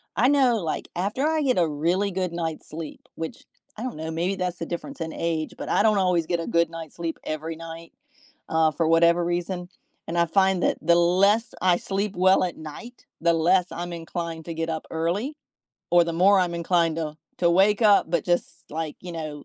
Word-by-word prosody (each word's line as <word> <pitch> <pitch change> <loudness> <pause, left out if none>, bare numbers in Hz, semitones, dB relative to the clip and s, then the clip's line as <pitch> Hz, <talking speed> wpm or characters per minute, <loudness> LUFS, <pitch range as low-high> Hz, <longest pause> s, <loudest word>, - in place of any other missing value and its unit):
I 245 +5 +4
know, 265 -5 +4
like, 165 -6 -3
after 205 +10 -1
I 315 -1 +1
get 255 -7 +2
a 170 - +3
really 175 +7 0
good 180 -1 -2
night's 165 -2 -4
sleep, 155 0 -7
which 160 0 -6 0.3
I 225 - -5
don't 255 - -4
know, 160 +1 -4
maybe 175 +4 -1
that's 180 -1 -3
the 165 - -3
difference 180 - -6
in 160 0 -4
age, 160 -2 -2
but - - -6
I - - +3
don't 215 -2 +4
always 180 -3 +2
get 175 -1 0
a 165 - -4
good 170 -1 +2
night's 165 -2 -8
sleep 165 -1 -3
every 160 +1 -4
night, 165 0 -9 0.6
uh, 160 -1 +3
for 165 +1 0
whatever 170 +1 +4
reason, 175 +1 -2 0.4
and 170 +1 -3
I 170 - +4
find 190 +1 +2
that - - +2
the 170 +2 +4
less 195 +7 +3
I 180 -1 +4
sleep 200 +1 -2
well 185 +1 +4
at 180 - -3
night, 235 - -10 0.2
the 170 0 +3
less 175 +2 +3
I'm 175 0 -5
inclined 165 -1 -5
to 165 - -5
get 165 0 -2
up 160 -1 -3
early, 195 - -2 0.5
or 175 -1 +6
the 170 - -3
more 195 +3 +5
I'm 175 -1 0
inclined 170 -1 +1
to 155 -2 -4 0.2
to 170 -1 +3
wake 200 +5 +4
up, 205 -5 +5
but 170 -4 0
just, 175 -1 -1
like, 155 -1 -4
you 175 -1 -8
know, 155 -3 -6
170 Hz, 215 wpm, -25 LUFS, 165-190 Hz, 0.6 s, or